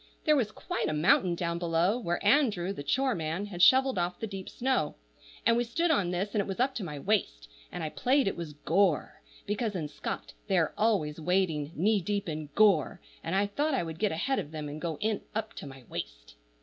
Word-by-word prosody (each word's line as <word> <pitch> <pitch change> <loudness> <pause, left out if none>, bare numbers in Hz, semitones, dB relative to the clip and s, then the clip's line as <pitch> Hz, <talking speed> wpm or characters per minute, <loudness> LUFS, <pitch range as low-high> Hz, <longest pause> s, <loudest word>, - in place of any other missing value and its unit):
There 305 - +5
was 235 -7 +1
quite 355 +10 -3
a - - -1
mountain 170 +3 +3
down 170 0 -2
below, 175 +6 +1
where 175 -4 -2
Andrew, 205 -7 +3
the 170 - -7
chore 260 - +1
man, 165 +3 -2
had 185 -4 -5
shovelled 260 0 +6
off 175 +1 -2
the - - -2
deep 195 -3 -7
snow; 255 - 0 0.5
and 230 - +5
we 240 - +2
stood 330 +9 0
on 200 - +2
this, 185 +3 -2
and 210 - +2
it - - -5
was 195 +1 -4
up 265 +2 +2
to 225 - -4
my 150 -4 -5
waist, 140 - -1 0.2
and - - -5
I 155 - -2
played 260 - +2
it - - 0
was 165 -3 -6
gore, 165 +1 +1 0.2
because 210 0 -2
in 160 -4 -2
Scott 150 - -6
they 195 -3 +2
are 165 - +2
always 170 -9 +1
wading 165 -4 0
knee 205 +4 +2
deep 205 +2 -2
in 155 -2 -4
gore, 200 -4 +4 0.2
and 165 +3 -2
I 200 +1 +3
thought 285 +9 0
I 255 - 0
would 160 -1 -7
get 210 -2 +1
ahead 260 +12 0
of 145 - -5
them 155 -1 -5
and 150 +1 -7
go 160 -2 -3
in 215 -1 0
up 220 0 -3
to - - -7
my 135 -1 -11
waist. - - -7
190 Hz, 225 wpm, -29 LUFS, 160-220 Hz, 0.5 s, shovelled